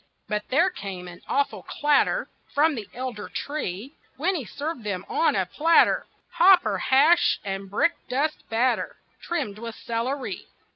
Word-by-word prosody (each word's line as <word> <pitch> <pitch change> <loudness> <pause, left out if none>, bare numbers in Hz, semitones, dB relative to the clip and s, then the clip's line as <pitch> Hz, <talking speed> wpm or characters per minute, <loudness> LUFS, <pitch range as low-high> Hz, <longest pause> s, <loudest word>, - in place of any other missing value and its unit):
But 210 0 -3
there 340 +8 +3
came 190 - -7
an 175 0 -11
awful 275 -8 0
clatter 295 - +1 0.3
From 310 +2 +4
that 220 -7 -6
elder 245 -4 -5
tree, 275 - -5 0.2
When 340 +8 +1
he 305 -9 -3
served 290 +1 -5
them 195 -3 -3
on 330 - +2
a 190 -2 +1
platter 325 - +3 0.2
Hopper 360 +1 +5
hash 290 +6 +4
and 195 0 -4
brick 335 - +2 0.2
dust 285 +5 -1
batter 240 +3 +1 0.3
Trimmed 215 -12 -3
with 230 -1 -6
celery! 250 +4 -3
260 Hz, 145 wpm, -25 LUFS, 210-315 Hz, 0.3 s, Hopper